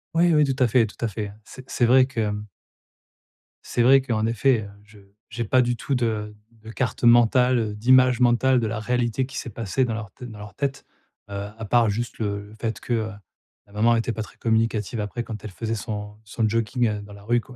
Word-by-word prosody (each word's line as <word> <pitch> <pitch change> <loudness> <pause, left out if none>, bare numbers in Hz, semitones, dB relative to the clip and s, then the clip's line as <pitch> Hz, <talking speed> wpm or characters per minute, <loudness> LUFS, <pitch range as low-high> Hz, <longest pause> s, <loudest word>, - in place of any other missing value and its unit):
Oui, 170 +1 +4
oui, 150 -1 +5
tout 135 -2 +1
à - - +4
fait, 115 0 +3
tout 105 - -14
à - - +1
fait. 105 -1 -5
C'est 130 0 -13
c'est 120 - +2
vrai 130 +2 +5
que, 135 -3 -6
hem 105 -1 -2 1.2
c'est - - -1
vrai 135 +3 +6
qu'en 115 -4 -1
effet, 115 +1 +2
heu, 100 - -9
je 105 0 -18 0.3
j'ai 115 +2 -3
pas 130 +4 +4
du 120 0 0
tout 135 +3 -2
de 110 -3 -2 0.3
de 110 - -9
carte 125 +2 -3
mentale, 120 +2 +5
heu, 110 -2 -2
d'image 130 +3 +4
mentale 125 +1 +4
de 115 - -1
la 110 0 -3
réalité 125 +2 0
qui 135 0 -9
s'est - - -4
passée 115 +4 -1
dans 115 - -2
leur 110 -3 -6
tête 125 - -10
dans 105 - -11
leur 105 0 -10
tête, 140 -1 -3 0.4
heu, - - -8 0.2
à 110 - -6
part 115 +1 +3
juste, 120 +4 -3
le 100 -2 -3
le 105 - -14
fait 110 0 -4
que, 125 - -3
heu, 110 -1 -1 0.6
la 100 - -20
maman 115 +3 +3
était 115 +1 0
pas 110 - -4
très 95 - -15
communicative 115 -1 0
après 105 +3 -4
quand 110 -3 -8
elle 110 - -7
faisait 115 +4 -3
son 105 -2 -6
son 110 +2 -1
jogging, 115 +2 0
heu, 105 -1 -3
dans 105 0 -12
la 100 0 -13
rue, 120 +3 +1
quoi. 125 +2 -15
115 Hz, 235 wpm, -24 LUFS, 105-125 Hz, 1.2 s, vrai